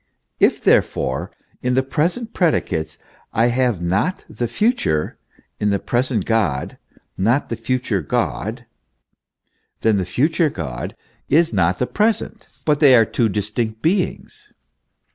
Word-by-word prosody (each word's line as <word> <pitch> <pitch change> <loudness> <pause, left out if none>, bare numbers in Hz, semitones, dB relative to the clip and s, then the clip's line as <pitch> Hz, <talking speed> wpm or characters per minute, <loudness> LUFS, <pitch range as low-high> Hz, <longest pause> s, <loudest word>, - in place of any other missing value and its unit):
If, - - +3
therefore, 65 0 +1 0.3
in 125 0 0
the 130 - +3
present 175 - -1
predicates 80 - 0 0.4
I 115 +1 +3
have 120 -7 0
not 100 - 0
the 120 - -3
future, 120 - 0 0.4
in 105 - +1
the 100 - +2
present 120 +3 -1
God 100 -13 0 0.4
not 115 +9 +1
the 115 - -2
future 115 -3 -1
God, - - -2 1.2
then 110 -2 +3
the 95 - -1
future 155 - +1
God 70 - -5 0.3
is 165 +3 +3
not 85 +2 +2
the 125 - 0
present, 215 - -1 0.2
but 150 -2 +2
they 140 -4 +7
are 115 -2 +6
two 115 +1 0
dis 105 +1 -3
tinct 110 -1 -3
beings. 205 - -1
120 Hz, 135 wpm, -20 LUFS, 100-150 Hz, 1.2 s, they